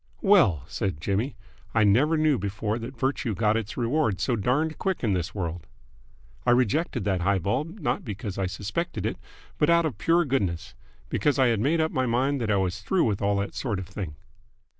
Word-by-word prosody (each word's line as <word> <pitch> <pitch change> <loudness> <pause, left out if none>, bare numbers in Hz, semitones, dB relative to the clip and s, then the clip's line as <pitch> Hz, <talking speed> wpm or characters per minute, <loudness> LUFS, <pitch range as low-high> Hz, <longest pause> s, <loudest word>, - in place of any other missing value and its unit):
"Well," 160 - +5
said 95 -1 -3
Jimmy, 105 - -1 0.4
"I 110 - +5
never 130 +11 +4
knew 155 -4 +3
before 100 +3 -2
that 120 +3 -7
virtue 130 -4 -1
got 105 +2 +2
its 115 -1 -3
reward 120 - +1
so 120 +6 +1
darned 140 +9 0
quick 190 -7 -1
in 105 -4 +2
this 90 0 -2
world. 85 -4 -4 0.8
I - - 0
rejected 125 - +2
that 95 -3 0
high 100 +2 +2
ball 100 - 0
not 165 - -3
because 105 -2 -5
I 95 - 0
suspected 105 - -3
it - - -2 0.4
but 150 - +3
out 170 0 +4
of 150 - -3
pure 170 +1 +3
goodness, 100 - -1 0.4
because 145 -1 +1
I 130 -2 +4
had 115 -3 +1
made 150 +9 +2
up 160 0 +1
my 130 -1 0
mind 130 +3 +1
that 110 - -1
I 100 - +3
was 95 0 -1
through 180 - +1
with 105 -4 0
all 100 0 +2
that 100 0 -2
sort 115 -7 -2
of 95 -1 -6
thing." 95 -5 -6
115 Hz, 205 wpm, -26 LUFS, 100-145 Hz, 0.8 s, Well